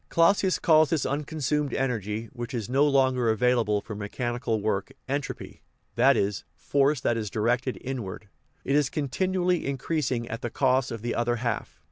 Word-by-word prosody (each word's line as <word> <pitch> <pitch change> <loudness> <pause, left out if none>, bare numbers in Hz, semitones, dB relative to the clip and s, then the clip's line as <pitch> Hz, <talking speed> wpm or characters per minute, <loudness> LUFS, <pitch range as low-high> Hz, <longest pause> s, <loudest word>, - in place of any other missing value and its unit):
Clausius 185 +2 +3
calls 155 -2 +4
this 165 -4 0
unconsumed 150 0 -1
energy, 115 -4 -2
which 120 +1 -5
is 115 -4 -3
no 135 +4 +3
longer 130 -4 +3
available 110 -2 +2
for 110 - -8
mechanical 115 +2 -2
work, 100 -2 -1 0.2
entropy 140 +1 -4 0.3
(that 130 +2 +4
is, 100 0 -1
force 140 0 +1
that 120 - 0
is 110 -2 -3
directed 120 +5 0
inward); 115 -6 -5 0.4
it 135 - +1
is 145 -2 +3
continually 180 +5 0
in 140 -1 -2
creasing 130 -5 -1
at 115 +1 -5
the 120 - -3
cost 130 +1 +2
of 115 -3 -6
the 120 - -1
other 120 0 0
half. 115 -8 -3
125 Hz, 165 wpm, -27 LUFS, 115-140 Hz, 0.4 s, calls